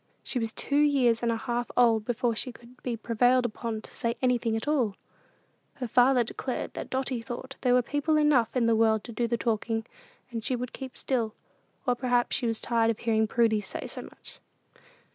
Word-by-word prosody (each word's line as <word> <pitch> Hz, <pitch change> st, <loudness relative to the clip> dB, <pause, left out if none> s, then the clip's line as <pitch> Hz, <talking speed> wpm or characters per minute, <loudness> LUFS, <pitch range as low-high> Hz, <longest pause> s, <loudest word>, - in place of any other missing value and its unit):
She 255 Hz, -, -1 dB
was 225 Hz, -1 st, -2 dB
two 285 Hz, +5 st, 0 dB
years 270 Hz, -6 st, +3 dB
and 235 Hz, -1 st, +1 dB
a 225 Hz, -, 0 dB
half 240 Hz, +1 st, -2 dB
old 230 Hz, -3 st, +4 dB
before 240 Hz, -1 st, 0 dB
she 250 Hz, +3 st, -4 dB
could 240 Hz, +1 st, -17 dB
be 240 Hz, -2 st, -3 dB
prevailed 245 Hz, +3 st, +3 dB
upon 225 Hz, -1 st, -3 dB
to -, -, -12 dB
say 235 Hz, -1 st, -1 dB
anything 245 Hz, -3 st, +1 dB
at 225 Hz, -, -3 dB
all. 250 Hz, -10 st, +1 dB, 0.8 s
Her 255 Hz, -3 st, -4 dB
father 250 Hz, +2 st, +4 dB
declared 250 Hz, +2 st, -4 dB
that -, -, -6 dB
Dotty 260 Hz, -2 st, -2 dB
thought 260 Hz, +3 st, -7 dB
there 250 Hz, -1 st, +4 dB
were 250 Hz, -, +4 dB
people 290 Hz, +4 st, +1 dB
enough 285 Hz, -7 st, +3 dB
in 245 Hz, -2 st, +3 dB
the 230 Hz, -1 st, +4 dB
world 220 Hz, -1 st, +3 dB
to 240 Hz, -, -8 dB
do 235 Hz, +1 st, -1 dB
the 235 Hz, 0 st, 0 dB
talking, 225 Hz, -1 st, -1 dB, 0.5 s
and 230 Hz, -2 st, -4 dB
she 255 Hz, -, 0 dB
would 250 Hz, 0 st, -5 dB
keep 265 Hz, -2 st, -8 dB
still; 230 Hz, -5 st, -1 dB, 0.5 s
or 250 Hz, -, +3 dB
perhaps 245 Hz, -1 st, +1 dB
she 245 Hz, -, 0 dB
was 225 Hz, -1 st, 0 dB
tired 230 Hz, -1 st, +1 dB
of 225 Hz, -, 0 dB
hearing 220 Hz, -1 st, +1 dB
Prudy 220 Hz, -1 st, +2 dB
say 195 Hz, -, -5 dB
so -, -, -5 dB
much. -, -, -13 dB
240 Hz, 205 wpm, -28 LUFS, 225-255 Hz, 0.8 s, old